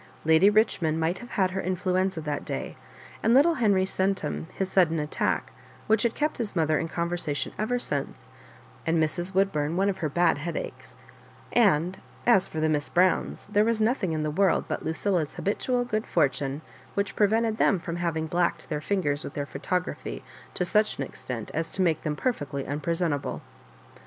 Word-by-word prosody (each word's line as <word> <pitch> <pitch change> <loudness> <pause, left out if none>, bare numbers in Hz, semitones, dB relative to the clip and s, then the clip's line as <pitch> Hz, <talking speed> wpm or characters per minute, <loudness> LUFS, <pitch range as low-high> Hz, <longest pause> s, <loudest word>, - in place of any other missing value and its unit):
Lady 160 +5 +6
Bichmond 190 -7 +2
might 165 +3 0
have 245 - -10
had 190 -2 +1
her 190 +1 -2
influenza 185 0 0
that 150 -2 -3
day, - - -5 0.5
and 230 +2 +4
little 320 +4 +5
Heniy 200 -5 +3
Centum 190 -3 -1
his 190 - -2
sudden 175 -4 +3
attack, 150 -1 -1 0.3
which 220 0 +3
had 235 -1 +1
kept 300 -1 -1
his 220 -5 -3
mother 155 -2 +2
in 165 - -2
conversation 170 -3 -2
ever 220 +4 0
since, 135 - -3 0.6
and 165 +1 +1
Mrs. 175 +4 0
Woodbum 165 -5 +1
one 195 +2 +2
of 190 - -3
her 155 - -1
bad 170 -1 +2
headaches; 170 +3 -6 0.6
and 185 -6 +3 0.3
as 230 -6 +5
for 160 - -5
the 155 - +2
Miss 150 -2 0
Browns, 185 +1 +2
there 210 0 +3
was 230 0 +1
nothing 220 -5 +1
in 155 -1 -1
the 155 - -1
world 190 +3 +2
but - - -3
Lucilla's 160 -1 -1
habitual 245 +5 0
good 215 -2 -2
fortune 140 -1 0 0.3
which 200 -1 -1
pre 205 - +4
vented 225 +1 +1
them 200 - +3
from 170 0 -5
having 165 -2 -1
blacked 175 +2 -1
their 150 -2 -2
fingers 155 -6 0
with - - -7
their 145 - -2
photography 180 +6 -3 0.3
to 180 - 0
such 210 +4 +2
an 140 - -1
extent 125 -4 -6
as 165 +1 -2
to - - -8
make 165 -4 +1
them 150 -2 -2
perfectly 145 - -2
unpresentable. 155 0 -2
175 Hz, 180 wpm, -27 LUFS, 155-200 Hz, 0.6 s, Lady